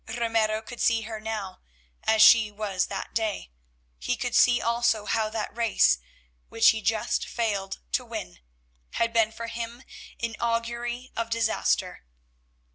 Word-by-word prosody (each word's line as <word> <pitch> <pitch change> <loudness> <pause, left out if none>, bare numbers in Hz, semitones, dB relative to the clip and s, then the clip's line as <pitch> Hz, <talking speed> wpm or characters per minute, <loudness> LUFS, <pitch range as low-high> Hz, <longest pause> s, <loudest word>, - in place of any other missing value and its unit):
Ramiro 225 -1 0
could 240 +1 -8
see 230 -1 +3
her 220 0 -6
now 215 -3 -5 0.5
as 220 0 +5
she 220 -1 +7
was 205 -3 -2
that - - -6
day; 215 - -2 0.5
he 245 - -2
could 245 -1 -3
see 245 -1 +5
also 235 -2 +1
how 220 0 0
that 215 -1 -4
race, 225 - +3 0.5
which 225 0 +5
he 220 0 +1
just 220 +3 0
failed 205 -5 -2
to - - +1
win, - - -7 0.5
had 230 0 0
been 225 -1 +3
for 230 +1 -7
him 235 +2 -6 0.4
an 230 -2 -3
augury 235 +2 -2
of 230 0 -2
disaster. 230 -1 0
225 Hz, 145 wpm, -26 LUFS, 215-235 Hz, 0.5 s, she